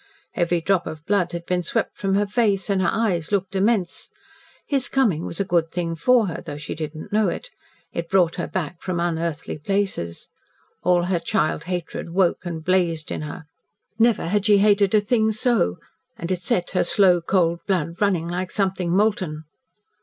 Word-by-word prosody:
Every 175 0 +1
drop 185 +1 +1
of 155 0 -7
blood 195 -4 +1
had 170 0 -5
been 180 0 0
swept 170 - -2
from 195 -1 0
her 205 +1 +2
face, 205 -3 +1
and 190 -1 +2
her 185 - +2
eyes 190 -8 0
looked 195 -1 -1
immense. 195 -2 0 0.6
His 275 -3 0
coming 215 - +1
was 170 - -6
a 200 - +1
good 170 -2 +1
thing 170 -1 -2
for 245 +6 +4
her, 170 -4 -4
though 145 - -6
she 150 - -5
did 155 0 -5
not 155 - -9
know 215 0 +3
it. - - -4 0.4
It 170 0 -4
brought 180 -4 +3
her 170 - -2
back 175 -2 -4
from 180 -2 -2
unearthly 165 -3 -2
places. 190 - -2 0.5
All 175 0 +3
her 175 -1 0
child 155 -1 0
hatred 175 -2 -4
woke 180 +1 +1
and 165 -2 -5
blazed 170 -4 +1
in - - -3
her. 155 +2 -7 0.5
Never 230 -1 +3
had 205 +2 +1
she 205 -1 +6
hated 205 0 +4
a 210 - +5
thing 220 +1 +2
so, 215 - +1 0.4
and 170 +2 -4
it 180 -1 -1
set 175 0 -1
her 180 - +2
slow, 180 -4 +4
cold 170 -1 +1
blood 175 -2 -1
running 185 -5 +2
like 180 +2 -3
something 190 -3 -1
molten. 185 -5 +1
180 Hz, 190 wpm, -23 LUFS, 170-200 Hz, 0.6 s, she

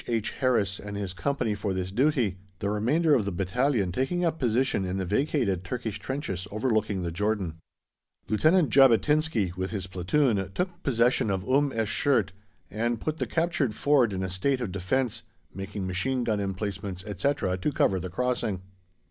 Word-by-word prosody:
H. 115 -3 -1
Harris 110 -7 +1
and 100 0 -6
his 100 -3 -4
Company 120 +2 -1
for 100 -2 -2
this 95 0 -3
duty, 125 - +1 0.2
the 100 +2 -2
remainder 145 +10 +2
of 125 -6 +4
the 100 - -2
battalion 100 +3 0
taking 155 - 0
up 160 -1 -1
position 125 -3 +1
in 95 +1 -2
the 95 - -1
vacated 105 - 0
Turkish 110 +2 -4
trenches 130 -9 -4
overlooking 110 -3 0
the 85 - -2
Jordan. 95 -3 -1 0.7
Lieutenant 155 - +3
Jabotinsky, 135 - +4
with 95 +1 -3
his 100 -4 -4
platoon, 95 +3 +1
took 180 -1 -2
possession 120 - +2
of 95 0 -2
Umm 140 +2 +3
esh 115 -2 -1 0.2
Shert 115 -9 +3 0.4
and 115 +2 -1
put 155 +5 -3
the - - -1
captured 160 -9 0
ford 135 -5 +3
in 95 -1 -2
a 95 - -2
state 125 +9 0
of 120 -7 -3
defence, 105 +7 -1 0.3
making 95 +1 -5
machine 120 +8 -1
gun 110 -3 0
emplacements, 100 -1 -4
etc., 105 -1 0
to 120 - 0
cover 95 -8 +2
the 90 +1 -5
crossing. 110 -2 -1
110 Hz, 170 wpm, -27 LUFS, 95-135 Hz, 0.7 s, of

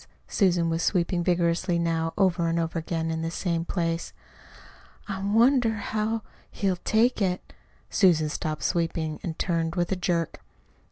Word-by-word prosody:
Susan 175 -4 +2
was 165 0 0
sweeping 175 -1 +1
vigorously 175 0 +1
now, 165 -1 0
over 180 -4 +2
and 165 0 0
over 165 0 -1
again 165 0 -2
in 160 0 -2
the 165 - -2
same 170 -1 -1
place. 165 -1 -2 0.9
"I 195 -2 -4
wonder 230 +3 +4
how 215 +1 -2 0.3
he'll 190 -3 -1
take 225 +5 +2
it." 185 -2 -1 0.4
Susan 165 -6 +4
stopped 155 0 -3
sweeping 165 -3 -1
and 160 -3 -5
turned 165 -2 -1
with 175 +1 0
a - - +2
jerk. 175 -3 -1
170 Hz, 150 wpm, -26 LUFS, 165-195 Hz, 0.9 s, wonder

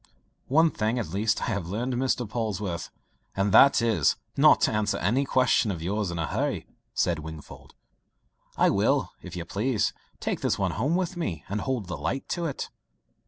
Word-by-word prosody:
"One 160 +4 +4
thing 110 +3 -1
at 115 -9 -2
least 110 +4 0
I 115 - -1
have 100 -5 -3
learned, 120 +7 -2
Mr. 125 -1 0
Polwarth 100 -5 -3 0.5
and 100 +1 +1
that 135 +2 +7
is, 105 -11 +3 0.2
not - - +6
to - - +3
answer 105 -1 0
any 125 +9 +1
question 130 -4 +3
of 85 -5 -3
yours 100 +2 -1
in 85 - -4
a 80 - -1
hurry," - - -2 0.3
said 85 -3 +1
Wingfold. 80 0 -10 0.8
"I - - +4
will, - - +2
if - - -9
you 85 -1 -4
please, 110 +5 0 0.3
take - - -2
this - - +1
one - - 0
home 140 - 0
with 185 0 -1
me, 90 - -3
and 100 +2 -2
hold 130 -4 -2
the 90 - -5
light 135 - -3
to 175 -1 -2
it." 145 - -5
110 Hz, 185 wpm, -27 LUFS, 95-130 Hz, 0.8 s, that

